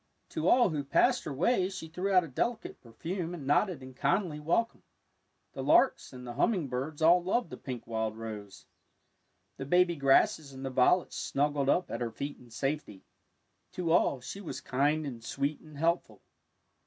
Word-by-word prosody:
To - - -2
all 245 -7 +5
who 150 -2 -2
passed 245 - +2
her 155 - -4
way 185 - +1
she 185 -4 -7
threw 180 +5 -3
out 185 -2 +5
a - - -6
delicate 225 - -3
perfume 170 - -5
and 150 -5 -8
nodded 145 +1 +1
in 130 0 -10
kindly 150 +4 0
welcome. 175 +10 0 0.7
The - - -5
larks - - +3
and 125 -1 -10
the 120 - -6
humming 160 - +1
birds 140 +5 -3
all 175 +2 +6
loved 230 +7 0
the - - -7
pink 125 -4 -7
wild 110 -1 -2
rose. 105 -3 -8 0.9
The 135 - -5
baby 180 +2 +3
grasses 140 0 +3
and 135 0 -7
the 135 - -3
violets 130 +8 +2
snuggled 140 -1 0
up 180 - +1
at - - -4
her 120 - -1
feet 140 +5 -6
in 120 - -17
safety. 130 -3 -4 0.7
To 170 -3 -2
all 160 -5 +3
she 150 +11 -7
was 180 - -6
kind 145 +4 0
and 120 -5 -7
sweet 140 +5 -2
and 155 -2 -14
helpful. 170 +3 -1
145 Hz, 180 wpm, -30 LUFS, 130-175 Hz, 0.9 s, all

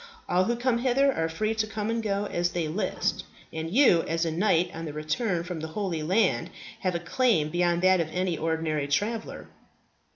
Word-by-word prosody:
All 185 +1 +2
who 235 - 0
come 240 0 +1
hither 265 +2 +3
are 165 -5 -1
free 215 +7 -1
to 220 -1 -1
come 215 0 -3
and 230 0 -1
go 205 -1 -1
as 175 -3 0
they 170 -3 -1
list, 185 +4 -1 0.3
and 160 0 -4
you, 205 -5 +5
as 165 +1 0
a 165 - -1
knight 175 0 +2
on 165 +1 -6
the 150 - -6
return 170 +4 -1
from 175 -2 -5
the 160 - -4
Holy 185 -6 -1
Land, 185 +9 +1 0.3
have 185 -2 -1
a - - 0
claim 175 - +1
beyond 175 0 +1
that 185 0 +5
of 165 - -2
an 180 -3 -1
ordinary 160 -2 -1
traveller." 215 +10 -2
180 Hz, 200 wpm, -27 LUFS, 165-215 Hz, 0.3 s, you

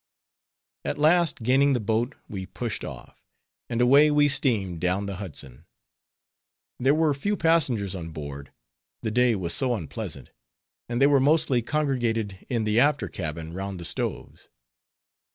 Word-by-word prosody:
At - - -2
last 160 -3 +3
gaining 135 +4 +4
the 125 - +1
boat 115 +5 -1
we 95 -2 -6
pushed - - -4
off, - - -9 0.5
and 115 - -2
away 140 +5 +6
we 145 0 +4
steamed 110 - 0
down 90 +3 0
the 100 -2 -5
Hudson. 75 -7 -8 1.1
There 135 +4 +3
were 155 -2 +2
few 200 +9 -2
passengers 130 - +2
on 85 -3 -6
board, 70 -3 -8 0.5
the 110 - -1
day 125 0 +3
was 90 -4 -2
so 130 -3 +1
unpleasant; 75 - -7 0.6
and 120 0 -1
they 135 - +6
were 140 -1 +5
mostly 140 -3 +2
congregated 115 - -1
in 120 -4 0
the 110 +1 +2
after 145 +2 +2
cabin 80 -1 -5
round 95 0 -5
the 85 - -5
stoves. - - -3
115 Hz, 150 wpm, -25 LUFS, 95-140 Hz, 1.1 s, away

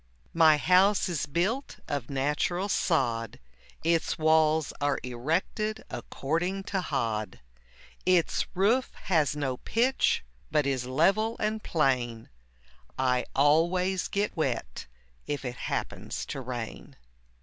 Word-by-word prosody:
My 160 -2 +6
house 190 +6 +4
is 170 -5 -2
built 195 - -1
of 140 -5 -3
natural 150 +8 0
sod, 115 - 0 0.4
Its 165 0 +1
walls 155 -1 +3
are 145 -1 +1
erected 165 - -2
according 175 +7 -2
to 190 - +1
hod; 110 -9 -2 0.6
Its 180 -2 +2
roof 220 +8 +2
has 155 -6 +2
no 135 -4 -2
pitch 245 - +1 0.3
but 150 -1 +2
is 130 -3 -1
level 195 - +2
and 215 0 -1
plain, 125 - 0 0.7
I 125 -2 +1
always 175 +6 +3
get 205 +1 -1
wet 125 - -2 0.4
if 145 -2 -3
it 125 -1 -4
happens - - -3
to 135 - -5
rain. 120 -3 -6
155 Hz, 115 wpm, -28 LUFS, 130-185 Hz, 0.7 s, My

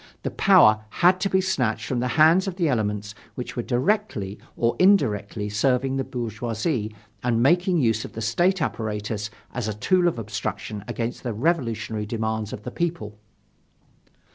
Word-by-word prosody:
The - - -2
power 110 0 +5 0.2
had 185 +1 +6
to 195 - 0
be 190 0 +3
snatched 130 -12 -1
from 125 - -1
the 125 - 0
hands 165 +5 +5
of 190 - -3
the 175 -3 +1
elements 105 -5 -1 0.2
which 125 - -6
were 120 - -1
directly 125 - -1 0.2
or 115 0 +1
indirectly 105 - +2
serving 125 +5 +1
the 135 - 0
bourgeoisie 115 - -3 0.3
and 120 -1 +1
making 175 +5 +3
use 110 -6 +1
of - - -9
the 115 - -6
state 175 - +1
apparatus 105 -3 -3 0.2
as 125 -4 -3
a 105 - -3
tool 180 - +2
of 170 - 0
obstruction 105 -1 -4
against 115 +1 -3
the 120 -3 -3
revolutionary 115 -7 -1
demands 110 -1 -2
of 105 - -7
the 125 - -6
people. 125 -12 -3
120 Hz, 165 wpm, -24 LUFS, 110-165 Hz, 0.3 s, had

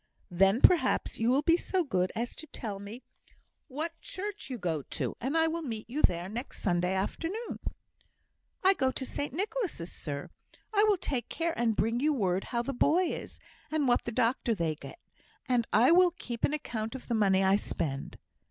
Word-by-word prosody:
"Then, 195 +6 +4
perhaps, 320 -8 +4
you 225 +1 +2
will 270 +4 +3
be 335 +2 +5
so 370 0 0
good 185 - 0
as 235 +2 -3
to 315 - -8
tell 215 -8 -5
me 210 +5 -9 0.6
what 320 +4 -4
church 410 -1 -5
you 255 - -3
go 170 -7 -1
to, - - -3
and 270 +7 0
I 325 - +4
will 335 +1 -2
meet 225 -8 -5
you 275 +6 -3
there 175 0 +3
next 235 +7 -6
Sunday 180 0 +1
afternoon?" 340 - -3 1.0
"I 380 +1 +7
go 265 -8 +1
to 260 0 -4
St 285 +3 -3
Nicholas', 370 - -3
sir. 145 -2 -6 0.4
I 410 0 +5
will 420 -2 +4
take 255 -8 -3
care 335 0 -1
and 230 -2 +1
bring 230 +3 +1
you 300 +3 +2
word 190 -7 0
how 235 -1 -1
the 275 +3 -3
boy 345 +8 +3
is, - - -7 0.3
and 305 -3 +1
what 245 - +3
doctor 235 0 +1
they 165 -5 0
get; 155 - -10 0.5
and 245 -3 +2
I 240 +7 +6
will 360 +1 +7
keep 245 -9 -7
an 290 - -1
account 225 -5 -4
of 265 - -8
the 240 - -1
money 195 -3 +3
I 190 +1 +5
spend." 140 -8 -3
245 Hz, 190 wpm, -30 LUFS, 200-320 Hz, 1.0 s, I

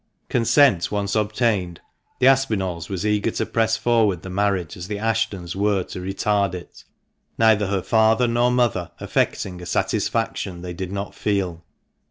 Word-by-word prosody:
Consent 120 - +3
once 100 -1 -1
obtained, 105 -5 0 0.4
the 125 - +1
Aspinalls 105 -11 +1
were 100 - -3
as 95 - -4
eager 105 -1 +1
to - - -2
press 115 -1 +1
forward 110 -7 +1
the 95 - -7
marriage 95 -2 -1
as 90 -2 -7
the 105 - -3
Ashtons 110 -5 -2
were 100 -1 +1
to - - -8
retard 95 0 0
it, 90 - -11 0.5
neither 110 -3 +4
her 95 -2 -1
father 110 +2 +3
nor 120 +1 +2
mother 120 -8 +1
affecting 90 -2 -1
a 90 - -8
satisfaction 90 -2 -1
they 90 -1 -5
did 90 +1 -5
not 100 0 -4
feel. 95 -5 -2
100 Hz, 160 wpm, -22 LUFS, 90-110 Hz, 0.5 s, neither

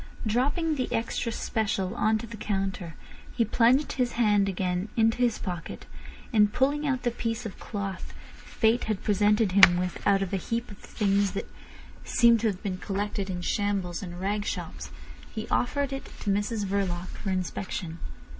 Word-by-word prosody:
Dropping 290 +8 +1
the 255 - -2
extra 230 +1 -1
special 205 -4 -1
on 220 +1 +2
to 215 - -6
the 230 0 -8
counter, 195 -5 -3 0.4
he 230 - +3
plunged 245 +6 +3
his 250 -2 0
hand 205 -4 +3
again 185 +1 -1
into 225 +1 +3
his 245 -3 +2
pocket, 175 -4 -6 0.5
and 210 -2 +5
pulling 290 +5 +1
out 260 -3 0
the 240 - +1
piece 230 0 -3
of 210 - -7
cloth 200 -3 -5 0.2
fate 225 +2 0
had 215 -3 -2
presented 210 0 +3
him 185 -2 +8
with 180 0 -2
out 195 -1 +4
of 195 - -5
a - - +2
heap 230 +5 -3
of 205 - -11
things 200 -2 +1
that 195 - -4 0.6
seemed 235 -1 +5
to 225 - +1
have 195 -3 -3
been 185 -2 -3
collected 200 0 -3
in 180 -1 -3
shambles 195 -2 -1
and 175 -2 -7
rag 205 +2 -1
shops, - - -5 0.5
he 220 - -4
offered 280 +2 0
it 270 - -5 0.2
to 200 - 0
Mrs 205 +1 0
Verloc 190 -2 -1
for 200 - -6
inspection. 180 -2 -3
205 Hz, 175 wpm, -27 LUFS, 195-230 Hz, 0.6 s, him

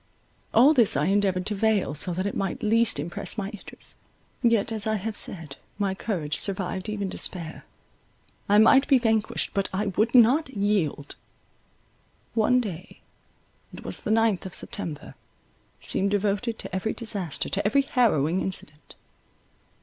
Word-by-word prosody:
All 260 +7 +6
this 235 - +3
I 145 - +1
endeavoured 190 -2 +1
to 210 - +1
veil, 205 -6 +1
so 155 +5 0
that 185 +2 -2
it 200 - -2
might 195 +4 -3
least 225 -4 +3
impress 170 +8 -3
my 200 -2 -3
Idris; 210 -2 -8 0.4
yet, 230 -2 +2
as 220 -1 -2
I 220 - +1
have 215 +1 -4
said, 160 -10 -1 0.2
my 200 -2 0
courage 175 -7 -2
survived 190 0 -1
even 205 -2 -2
despair: 170 -3 -2 0.8
I 205 - +5
might 265 +6 +6
be 275 - +5
vanquished, 225 -3 0
but 195 -1 -1
I 200 +3 -1
would 225 +4 +1
not 255 +6 +5
yield. 200 - -1 1.2
One 240 +3 +3
day, 195 -5 -7 0.7
it - - -11
was - - -5
the - - -5
ninth 220 -4 +2
of 185 - -8
September, 160 -8 -5 0.7
seemed 200 - 0
devoted 205 +3 -1
to - - -7
every 205 +4 -1
disaster, 205 - -4
to 200 - 0
every 245 +7 +3
harrowing 190 - +2
incident. 150 -5 -7
205 Hz, 150 wpm, -25 LUFS, 185-225 Hz, 1.2 s, All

